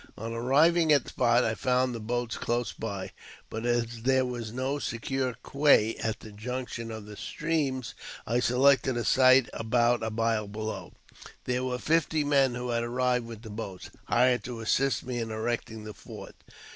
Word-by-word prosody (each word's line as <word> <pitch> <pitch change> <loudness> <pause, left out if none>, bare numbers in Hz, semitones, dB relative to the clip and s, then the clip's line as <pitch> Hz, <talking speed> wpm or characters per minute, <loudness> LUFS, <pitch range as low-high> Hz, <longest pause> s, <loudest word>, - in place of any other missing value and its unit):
On 115 +2 -5
arriving 155 +8 +3
at 140 -4 +5
the - - -10
spot, 120 0 +3
I 110 - +1
found 125 +2 +1
the 115 - -5
boats 120 +1 -2
close 120 0 -1
by, 100 -4 -5 0.4
but 110 +2 -3
as 120 -1 -1
there 130 +1 +3
was 120 -3 -5
no 130 +4 -2
secure 130 0 -2
quay 140 -6 +4
at 110 -1 -3
the 110 - -10
junction 115 +2 -5
of 110 -2 -7
the 105 0 -10
streams, 145 -3 -2 0.3
I 120 +2 +1
selected 130 +1 +3
a 120 - -2
site 130 -1 +6
about 120 +1 +2
a 110 - -1
mile 110 -1 0
below. 105 -3 -5 0.5
There 125 0 -1
were 125 -1 -1
fifty 160 +1 +1
men, 135 -3 +3
who 125 0 -4
had 115 -1 0
arrived 125 0 0
with 115 -1 -9
the 110 - -8
boats, 105 -4 -7
hired 125 +1 +3
to 120 -2 -6
assist 135 +4 +1
me 125 -1 -3
in 115 -1 -3
erecting 110 0 -3
the 105 0 -7
fort. - - -10
120 Hz, 180 wpm, -28 LUFS, 115-130 Hz, 0.5 s, site